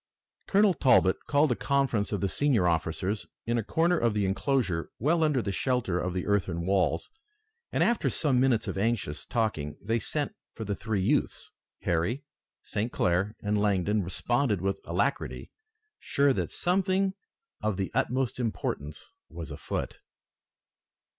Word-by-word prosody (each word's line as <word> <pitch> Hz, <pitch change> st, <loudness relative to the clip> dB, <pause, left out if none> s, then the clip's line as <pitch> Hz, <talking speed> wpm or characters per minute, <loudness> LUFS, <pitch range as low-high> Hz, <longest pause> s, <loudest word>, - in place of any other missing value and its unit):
Colonel 200 Hz, -1 st, +4 dB
Talbot 110 Hz, -, +4 dB
called 145 Hz, -1 st, +3 dB
a -, -, +2 dB
conference 135 Hz, -7 st, 0 dB
of 100 Hz, -, -1 dB
the 100 Hz, -, +2 dB
senior 120 Hz, -5 st, +2 dB
officers 90 Hz, +5 st, -1 dB, 0.2 s
in 120 Hz, +1 st, +1 dB
a -, -, -2 dB
corner 170 Hz, -, +2 dB
of 115 Hz, -2 st, +1 dB
the 105 Hz, -2 st, +1 dB
enclosure 95 Hz, -, 0 dB
well 160 Hz, +7 st, +2 dB
under 145 Hz, -6 st, +2 dB
the 100 Hz, -, -2 dB
shelter 115 Hz, -5 st, 0 dB
of 90 Hz, 0 st, -2 dB
the 90 Hz, -, -2 dB
earthen 90 Hz, -4 st, 0 dB
walls, 95 Hz, -4 st, +1 dB, 0.6 s
and -, -, +2 dB
after 235 Hz, -, +2 dB
some 135 Hz, -6 st, +3 dB
minutes 125 Hz, -4 st, +2 dB
of -, -, -2 dB
anxious 100 Hz, -9 st, -1 dB
talking 90 Hz, -11 st, -1 dB
they 115 Hz, +3 st, 0 dB
sent 145 Hz, +5 st, -2 dB, 0.2 s
for 110 Hz, -, -5 dB
the 100 Hz, -, -1 dB
three 105 Hz, -2 st, -2 dB
youths. -, -, 0 dB, 0.3 s
Harry, 85 Hz, -, 0 dB, 0.4 s
St. 110 Hz, +4 st, -2 dB
Clair 95 Hz, +4 st, +1 dB
and 105 Hz, 0 st, +1 dB
Langdon 105 Hz, 0 st, +2 dB
responded 105 Hz, +4 st, 0 dB
with 95 Hz, +1 st, -1 dB
alacrity, 100 Hz, +11 st, -1 dB, 0.5 s
sure 140 Hz, 0 st, +2 dB
that -, -, -2 dB
something 190 Hz, +1 st, +1 dB, 0.5 s
of 105 Hz, -3 st, 0 dB
the 95 Hz, -1 st, -2 dB
utmost 130 Hz, 0 st, 0 dB
importance 80 Hz, -, -4 dB, 0.2 s
was 80 Hz, -3 st, -7 dB
afoot. -, -, -4 dB
110 Hz, 150 wpm, -28 LUFS, 95-135 Hz, 0.6 s, Colonel